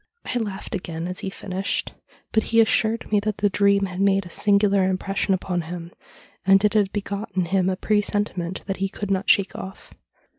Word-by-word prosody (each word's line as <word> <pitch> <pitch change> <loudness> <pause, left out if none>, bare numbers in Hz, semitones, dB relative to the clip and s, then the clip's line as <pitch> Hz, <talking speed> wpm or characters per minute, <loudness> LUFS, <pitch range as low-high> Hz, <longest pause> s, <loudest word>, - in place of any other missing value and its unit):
I 245 - -1
laughed 205 -2 -5
again 170 -3 -4
as 180 0 -4
he 195 - -3
finished, 190 0 -3 0.4
but 220 - +3
he 230 +1 +1
assured 225 0 +2
me 210 - +4
that 210 0 -2
the 205 0 +1
dream 200 0 +3
had 185 0 -4
made 195 -1 +3
a 175 - -10
singular 200 -1 +3
impression 195 +1 0
upon 180 -1 -2
him, 170 +1 -7 0.5
and 195 +2 +5
it 210 - +2
had 205 -3 +2
begot 205 +1 -4
in 185 -2 +1
him 190 +1 +1
a 185 - 0
presentiment 205 -3 -1
that 195 -1 -3
he 195 0 -1
could 205 0 -5
not 195 +1 0
shake 195 -1 +4
off. 190 0 -9
195 Hz, 195 wpm, -23 LUFS, 185-205 Hz, 0.5 s, and